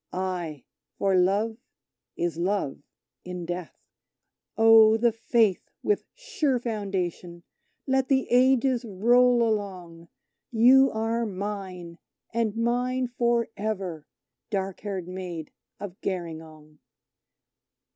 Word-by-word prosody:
Ay, 175 Hz, -7 st, -4 dB, 0.3 s
for 195 Hz, -1 st, +2 dB
Love 200 Hz, +5 st, +2 dB, 0.6 s
is 170 Hz, -1 st, -1 dB
Love 175 Hz, -5 st, -1 dB, 0.4 s
in 180 Hz, -1 st, -6 dB
Death. 175 Hz, 0 st, -6 dB, 0.8 s
Oh! 225 Hz, 0 st, +7 dB
the 235 Hz, +1 st, +3 dB
Faith 225 Hz, -3 st, +1 dB
with 415 Hz, -, 0 dB
sure 315 Hz, -, -1 dB
foundation! 190 Hz, -7 st, -4 dB, 0.4 s
let 265 Hz, -1 st, +1 dB
the 265 Hz, -1 st, +2 dB
Ages 255 Hz, 0 st, +3 dB
roll 240 Hz, +3 st, +3 dB
along, 180 Hz, -6 st, -4 dB, 0.4 s
You 255 Hz, +4 st, +6 dB
are 225 Hz, +2 st, -1 dB
mine, 185 Hz, -4 st, -6 dB, 0.3 s
and 225 Hz, -2 st, 0 dB
mine 245 Hz, +2 st, 0 dB
for 235 Hz, -1 st, +1 dB
ever, 190 Hz, -7 st, -4 dB, 0.4 s
dark 195 Hz, -2 st, -3 dB
haired 195 Hz, -4 st, -5 dB
Maid 180 Hz, -4 st, -6 dB, 0.3 s
of 195 Hz, -2 st, -8 dB
Gerringong. 160 Hz, -4 st, -6 dB
205 Hz, 100 wpm, -26 LUFS, 180-235 Hz, 0.8 s, Oh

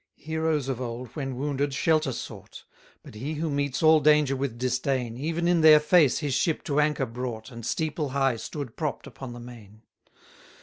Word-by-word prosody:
62 160 Hz, -, -12 dB
Heroes 160 Hz, -3 st, 0 dB
of 130 Hz, -2 st, -3 dB
old, 120 Hz, +1 st, -5 dB
when 135 Hz, 0 st, -5 dB
wounded, 140 Hz, +1 st, -2 dB
shelter 155 Hz, -3 st, +2 dB
sought; -, -, -8 dB, 0.4 s
But -, -, -12 dB
he 135 Hz, +9 st, -5 dB
who 155 Hz, +1 st, -2 dB
meets 140 Hz, 0 st, -1 dB
all 160 Hz, 0 st, +7 dB
danger 150 Hz, -2 st, +4 dB
with 135 Hz, -3 st, -3 dB
disdain, 125 Hz, -1 st, -1 dB
Even 165 Hz, +6 st, -2 dB
in 175 Hz, -1 st, +3 dB
their 155 Hz, -1 st, +8 dB
face 150 Hz, -2 st, +4 dB
his 145 Hz, -3 st, -2 dB
ship 165 Hz, +3 st, 0 dB
to 145 Hz, 0 st, 0 dB
anchor 150 Hz, -2 st, +1 dB
brought, 120 Hz, -1 st, -6 dB
And 115 Hz, -1 st, -9 dB
steeple 150 Hz, +3 st, -2 dB
high 135 Hz, -2 st, +1 dB
stood 140 Hz, 0 st, -6 dB
propt 150 Hz, -4 st, -3 dB
upon 135 Hz, -2 st, -9 dB
the 120 Hz, -, -9 dB
main. 115 Hz, -3 st, -13 dB
140 Hz, 185 wpm, -26 LUFS, 125-155 Hz, 0.4 s, their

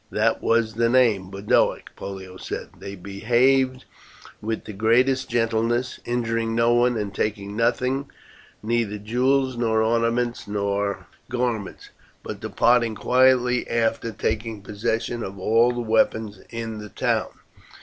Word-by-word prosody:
"That -, -, +1 dB
was 115 Hz, -1 st, +2 dB
the 115 Hz, +1 st, +2 dB
name 115 Hz, -7 st, +3 dB
Boduoc," 100 Hz, +2 st, 0 dB
Pollio 95 Hz, -1 st, -8 dB
said. -, -, -6 dB
"They 100 Hz, 0 st, -7 dB
behaved 125 Hz, +7 st, +1 dB, 0.6 s
with 110 Hz, +1 st, -3 dB
the 105 Hz, -, -7 dB
greatest 125 Hz, +6 st, +2 dB
gentleness, 115 Hz, +2 st, 0 dB
injuring 115 Hz, -1 st, -1 dB
no 115 Hz, +1 st, +3 dB
one 120 Hz, 0 st, +3 dB
and 105 Hz, -2 st, -3 dB
taking 100 Hz, 0 st, -3 dB
nothing, 125 Hz, +4 st, 0 dB, 0.5 s
neither 110 Hz, -2 st, 0 dB
jewels, 130 Hz, +4 st, +1 dB
nor 110 Hz, -2 st, +2 dB
ornaments, 115 Hz, 0 st, 0 dB
nor 100 Hz, 0 st, -1 dB, 0.2 s
garments, 120 Hz, -5 st, -3 dB, 0.3 s
but -, -, -6 dB
departing 115 Hz, -2 st, +2 dB
quietly 125 Hz, 0 st, +3 dB
after 115 Hz, 0 st, 0 dB
taking 110 Hz, 0 st, -3 dB
possession 115 Hz, +3 st, -2 dB
of 95 Hz, -2 st, -6 dB
all 115 Hz, +5 st, +3 dB
the 120 Hz, 0 st, -3 dB
weapons 110 Hz, -2 st, +1 dB
in 115 Hz, -2 st, -5 dB
the 105 Hz, 0 st, -8 dB
town. -, -, -1 dB
115 Hz, 130 wpm, -24 LUFS, 105-120 Hz, 0.6 s, name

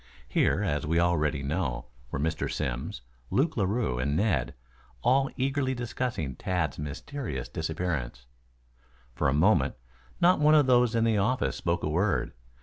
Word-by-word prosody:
Here, -, -, +2 dB
as 75 Hz, 0 st, -1 dB
we 85 Hz, +2 st, +2 dB
already 75 Hz, -4 st, +1 dB
know, 70 Hz, -4 st, -2 dB, 0.2 s
were -, -, -3 dB
Mr. 80 Hz, +3 st, -1 dB
Simms, -, -, -3 dB, 0.3 s
Luke 150 Hz, +5 st, +1 dB
Larue 100 Hz, -, 0 dB
and 70 Hz, +3 st, 0 dB
Ned, 75 Hz, -, 0 dB, 0.5 s
all 135 Hz, +2 st, +3 dB
eagerly 135 Hz, 0 st, 0 dB
discussing 120 Hz, -, -3 dB
Tad's 80 Hz, -4 st, -2 dB
mysterious 75 Hz, -, -5 dB
disappearance. 80 Hz, -7 st, -3 dB, 0.9 s
For -, -, 0 dB
a -, -, +1 dB
moment 80 Hz, -3 st, +3 dB, 0.4 s
not 175 Hz, 0 st, +5 dB
one 150 Hz, +1 st, +5 dB
of 150 Hz, -2 st, +6 dB
those 125 Hz, -2 st, +4 dB
in 115 Hz, -, +3 dB
the 110 Hz, -2 st, +2 dB
office 125 Hz, +6 st, +1 dB
spoke 85 Hz, 0 st, -1 dB
a -, -, 0 dB
word. 90 Hz, +6 st, 0 dB
85 Hz, 145 wpm, -28 LUFS, -, 0.9 s, of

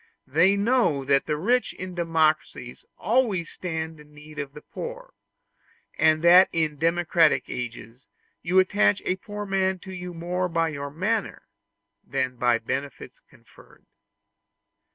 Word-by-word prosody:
They 170 Hz, +8 st, +3 dB
know 200 Hz, -, +1 dB
that 140 Hz, 0 st, +2 dB
the 150 Hz, -, -1 dB
rich 245 Hz, +10 st, +1 dB
in 185 Hz, 0 st, -7 dB
democracies 160 Hz, -7 st, -1 dB
always 210 Hz, -5 st, 0 dB
stand 160 Hz, -3 st, -5 dB
in 150 Hz, 0 st, -17 dB
need 150 Hz, 0 st, -11 dB
of 140 Hz, -1 st, -5 dB
the 150 Hz, -, -11 dB
poor; -, -, -8 dB, 0.8 s
and 155 Hz, 0 st, +3 dB
that 180 Hz, +2 st, +7 dB
in 155 Hz, -3 st, -1 dB
democratic 165 Hz, 0 st, +2 dB
ages 120 Hz, 0 st, -7 dB, 0.3 s
you 180 Hz, +2 st, 0 dB
attach 200 Hz, +2 st, +3 dB
a 185 Hz, -, 0 dB
poor 205 Hz, +2 st, -7 dB
man 190 Hz, -1 st, 0 dB
to 190 Hz, -, -8 dB
you 180 Hz, -1 st, -7 dB
more 180 Hz, +2 st, -2 dB
by 165 Hz, -1 st, 0 dB
your 140 Hz, -2 st, -5 dB
manner 200 Hz, +8 st, -2 dB, 0.6 s
than 130 Hz, -1 st, -2 dB
by 120 Hz, -1 st, +2 dB
benefits 135 Hz, +5 st, -6 dB
conferred. -, -, -21 dB
165 Hz, 135 wpm, -25 LUFS, 150-190 Hz, 0.8 s, that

